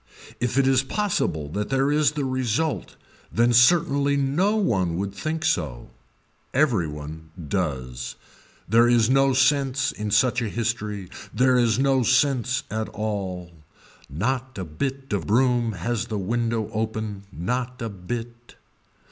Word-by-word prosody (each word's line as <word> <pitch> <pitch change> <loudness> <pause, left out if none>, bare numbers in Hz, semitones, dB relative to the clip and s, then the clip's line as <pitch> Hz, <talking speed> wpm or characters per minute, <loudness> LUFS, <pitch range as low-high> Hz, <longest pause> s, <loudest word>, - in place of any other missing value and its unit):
If 125 +1 -1
it 135 - +4
is 130 -1 +4
possible 135 - -1
that 105 +6 -3
there 135 +1 +2
is 150 0 +3
the 145 -2 -2
result 130 +3 -1 0.4
then 120 +1 +3
certainly 140 +2 +4
no 155 +10 +1
one 95 - +1
would 100 +1 -3
think 155 +10 -3
so. 65 - -1 0.6
Every 125 - +3
one 75 +2 -8 0.2
does. 65 -9 -3 0.5
There 115 +4 +5
is 120 0 +4
no 135 0 +4
sense 130 0 +2
in 105 0 -5
such 120 +4 +3
a 115 - -2
history. 105 -4 -3 0.2
There 130 0 +3
is 120 -3 +3
no 135 0 +3
sense 130 +1 +2
at 110 +1 -2
all. 95 -5 -4 0.6
Not 130 - -2
a 95 - -4
bit 135 - -4
of 100 - -2
broom 120 0 +2
has 105 +5 -2
the 110 - -3
window 115 +2 -1
open, 110 -2 -3
not 125 +8 -3
a 115 - -3
bit. 115 +5 -7
120 Hz, 140 wpm, -24 LUFS, 100-135 Hz, 0.6 s, There